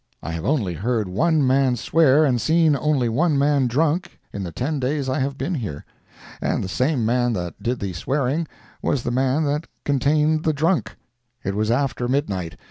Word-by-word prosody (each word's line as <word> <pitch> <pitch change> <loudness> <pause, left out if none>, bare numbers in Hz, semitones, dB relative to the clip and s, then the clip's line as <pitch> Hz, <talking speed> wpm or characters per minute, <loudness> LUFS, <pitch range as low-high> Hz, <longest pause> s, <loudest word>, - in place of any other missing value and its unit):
I - - -4
have 85 -1 -4
only 120 - 0
heard 110 +4 -1
one 150 - +2
man 130 -1 +3
swear 155 +4 +4
and 125 -4 +1
seen 160 +3 +3
only 140 -3 +1
one 145 +6 +1
man 140 -2 +3
drunk 155 +7 0 0.2
in 100 - -4
the 90 -3 -5
ten 140 - -2
days 135 +1 -1
I 130 - 0
have 135 +1 -2
been 180 - -2
here. 105 - -5 0.6
And - - 0
the - - -3
same 125 +4 0
man 120 +1 +1
that 90 -5 -5
did 125 +1 -1
the 95 -2 -4
swearing 140 - -1 0.3
was 130 - 0
the 120 - -2
man 130 +4 +1
that 150 +2 -1 0.2
contained 150 +3 +2
the 155 - +2
drunk. 160 +5 0 0.5
It 100 - -2
was 105 +2 -1
after 125 0 0
midnight. 100 - -2
130 Hz, 190 wpm, -22 LUFS, 115-150 Hz, 0.6 s, swear